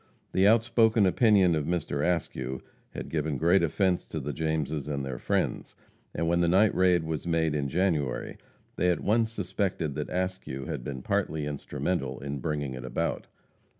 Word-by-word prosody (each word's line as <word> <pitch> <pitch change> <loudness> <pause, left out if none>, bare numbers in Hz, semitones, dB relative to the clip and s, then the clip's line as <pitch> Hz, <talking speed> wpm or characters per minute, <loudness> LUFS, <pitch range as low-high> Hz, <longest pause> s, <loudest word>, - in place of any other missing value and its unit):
The 95 +1 +4
outspoken 115 -1 +4
opinion 95 -2 +4
of 75 -2 0
Mr. 80 -4 -1
Askew 75 -6 -2 0.3
had - - -5
given 75 -2 -1
great 85 +6 +4
offense 90 +2 +1
to 80 - -4
the 75 +1 -4
Jameses 80 -2 -2
and 70 -2 -2
their 65 -2 -5
friends, - - -1 0.4
and 85 - 0
when 85 +1 +2
the 85 - +3
night 95 +5 +4
raid 90 -2 +3
was 80 +1 -4
made 80 -2 +1
in 70 -2 -1
January 80 -6 -1 0.4
they 90 - +2
at 90 - +1
once 110 +2 +2
suspected 95 -6 -2
that - - -4
Askew 90 -7 -3
had 65 - -4
been 65 0 -6
partly 90 -7 -1
instrumental 70 -1 -3
in 70 +1 -4
bringing 75 -4 -2
it 65 -1 -7
about. 65 -1 -2
80 Hz, 170 wpm, -28 LUFS, 70-95 Hz, 0.4 s, The